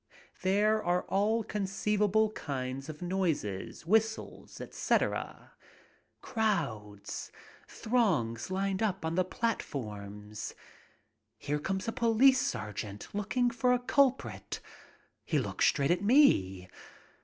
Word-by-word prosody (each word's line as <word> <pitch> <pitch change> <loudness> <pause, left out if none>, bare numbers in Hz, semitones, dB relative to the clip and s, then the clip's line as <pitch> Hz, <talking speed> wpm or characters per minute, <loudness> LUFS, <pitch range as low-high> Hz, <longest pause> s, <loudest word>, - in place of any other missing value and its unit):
There 210 +3 +2
are 175 +1 +1
all 215 +4 +1
conceivable 210 +1 +1
kinds 135 -5 -4
of 155 +3 -7
noises, 165 - -2
whistles, 220 +4 0
etc. - - -1 0.7
Crowds, 120 - -2 0.4
throngs 170 - 0
lined 195 +1 -1
up 195 -5 0
on 160 - -1
the 185 +2 +3
platforms. 105 - -4 0.8
Here 150 +1 -2
comes 190 +7 -3
a - - +1
police 245 +2 +4
sergeant 105 -1 -4
looking 240 +4 0
for 250 +1 +2
a 250 - +2
culprit. 270 +1 +1 0.6
He - - 0
looks - - +1
straight 140 +1 +2
at 175 +1 +2
me. 95 - +4
190 Hz, 105 wpm, -31 LUFS, 130-220 Hz, 0.8 s, police